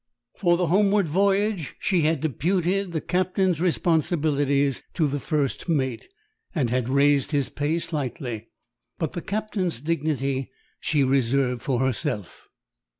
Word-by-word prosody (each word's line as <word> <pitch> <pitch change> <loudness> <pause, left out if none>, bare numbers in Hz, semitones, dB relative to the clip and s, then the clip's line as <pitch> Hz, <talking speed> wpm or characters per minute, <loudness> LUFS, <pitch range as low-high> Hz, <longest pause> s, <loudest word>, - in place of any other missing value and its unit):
For 175 -2 +2
the 180 - +1
homeward 200 +2 +3
voyage 195 0 +1
she 180 -3 +1
had 155 -2 +1
deputed 180 - 0
the 160 -2 -2
captain's 185 -2 0
responsibilities 145 -5 +1
to 165 - +2
the 145 0 -1
first 150 +2 -2
mate, 130 -7 -1 0.5
and 130 -8 +1
had 125 -1 0
raised 140 +1 +3
his 145 -4 0
pay 145 +4 -1
slightly, 130 -8 -3 0.5
but 160 - -2
the 175 - -4
captain's 200 - -2
dignity 140 -3 -1 0.3
she 150 -3 +1
reserved 130 -1 +1
for 130 -3 0
herself. 130 - -2
155 Hz, 130 wpm, -25 LUFS, 135-175 Hz, 0.5 s, homeward